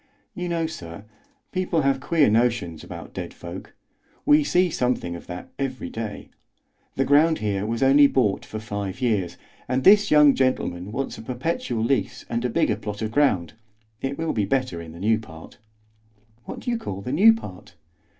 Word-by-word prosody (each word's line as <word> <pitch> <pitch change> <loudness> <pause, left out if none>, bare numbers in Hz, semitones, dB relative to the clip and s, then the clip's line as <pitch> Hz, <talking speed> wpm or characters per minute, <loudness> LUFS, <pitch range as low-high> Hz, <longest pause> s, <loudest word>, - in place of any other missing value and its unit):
"You 180 0 -4
know, 165 -1 0
sir, 95 - -8 0.5
people 180 -4 0
have 135 -1 +2
queer 155 +2 +3
notions 110 -7 +1
about - - -9
dead - - -6
folk. - - -9 0.5
We 150 +1 +5
see 180 +4 +2
something 125 - -1
of 85 - -10
that 90 0 -7
every 135 -2 -3
day. 110 -2 -6 0.7
The 135 - +1
ground 155 +4 +4
here 105 -1 -2
was 115 +3 -1
only 140 +2 +7
bought 115 -8 +1
for 110 - -7
five 105 -2 -5
years, 105 -9 0 0.3
and 130 +1 0
this 205 +3 +6
young 150 -2 +7
gentleman 105 -8 -1
wants 135 +4 -4
a - - -7
perpetual 125 - -2
lease 135 +3 -1
and 115 0 -1
a 125 - 0
bigger 110 -2 +1
plot 105 0 -5
of 110 - -2
ground; 115 - +2 0.5
it 135 +1 -3
will 165 0 -1
be 105 - 0
better 125 -9 -1
in 80 -1 -10
the 85 - -11
new 110 +3 +2
part." 80 -7 -13 0.9
"What - - -7
do 245 - -2
you 235 - -1
call 100 - -5
the 125 - -5
new 200 +10 +7
part?" 95 - -10
125 Hz, 180 wpm, -24 LUFS, 105-145 Hz, 0.9 s, only